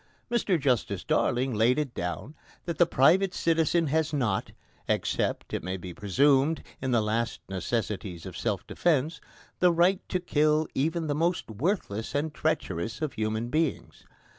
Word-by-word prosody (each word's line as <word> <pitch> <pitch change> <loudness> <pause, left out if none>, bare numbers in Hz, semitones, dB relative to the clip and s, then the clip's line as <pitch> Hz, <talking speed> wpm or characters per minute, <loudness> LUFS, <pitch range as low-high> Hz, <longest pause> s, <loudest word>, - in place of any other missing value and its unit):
Mr 210 -7 +2
Justice 120 -9 0
Darling 125 +1 +1
laid 115 +5 +3
it 145 -5 -2
down 90 - -4 0.3
that 170 -2 -4
the 175 - +6
private 180 +6 +4
citizen 165 0 +2
has 155 +1 +1
not 120 -10 -1 0.4
except, - - -1
it - - -1
may 95 +2 -3
be 90 -1 -8
presumed, 135 - +2 0.2
in 130 - -2
the 120 -3 +3
last 115 +2 -1
necessities 95 -2 -3
of - - -8
self - - -2
defence 160 -1 0 0.4
the 180 -1 +5
right 175 +3 +3
to 185 - 0
kill 155 -2 +2
even 160 +4 0
the 150 - 0
most 165 -4 0
worthless 115 - -2
and 150 +2 -1
treacherous 110 - -2
of 155 -3 -2
human 110 +2 -2
beings. 155 +1 -2
140 Hz, 155 wpm, -28 LUFS, 110-165 Hz, 0.4 s, the